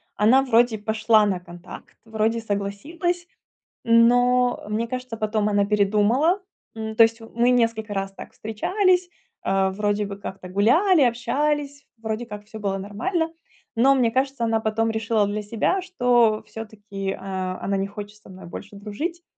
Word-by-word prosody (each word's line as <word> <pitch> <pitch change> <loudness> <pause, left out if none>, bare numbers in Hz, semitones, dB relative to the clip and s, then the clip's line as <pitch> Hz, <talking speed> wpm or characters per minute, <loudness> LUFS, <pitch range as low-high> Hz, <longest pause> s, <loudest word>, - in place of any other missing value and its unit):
Она 230 +6 +5
вроде 240 -3 +3
пошла 220 +1 +3
на 190 -3 0
контакт, 175 -1 -12
вроде 220 +1 0
согласилась, 285 - -3 0.6
но, 245 +2 +4
мне 225 +2 -1
кажется, 255 -2 -5
потом 215 -1 0
она 205 -1 +2
передумала. 210 - +2 0.4
М, 220 0 -5
то 230 - +8
есть 225 +1 +1
мы 235 +2 0
несколько 230 -3 +1
раз 195 0 -3
так - - -11
встречались, 360 - 0 0.3
а, 195 0 +1
вроде 205 +1 0
бы 200 0 -7
как-то 190 -2 -8
гуляли, 295 - +4
общались, 285 +4 -1
вроде 220 +1 -4
как 210 -2 -8
всё 220 +1 -10
было 200 -2 -1
нормально. 240 - -2 0.5
Но, 265 +4 +5
мне 240 -4 +2
кажется, 265 -1 -1
она 225 -1 +1
потом 220 +1 0
решила 220 -1 +1
для 210 +1 -2
себя, 230 - 0
что 245 -11 +3 0.2
всё-таки, 210 -3 -6
э, - - -5 0.5
она 195 0 0
не 195 0 -1
хочет 205 +1 -9
со 210 - -18
мной 185 0 -11
больше 205 +4 -9
дружить. 295 - -5
225 Hz, 155 wpm, -23 LUFS, 205-250 Hz, 0.6 s, то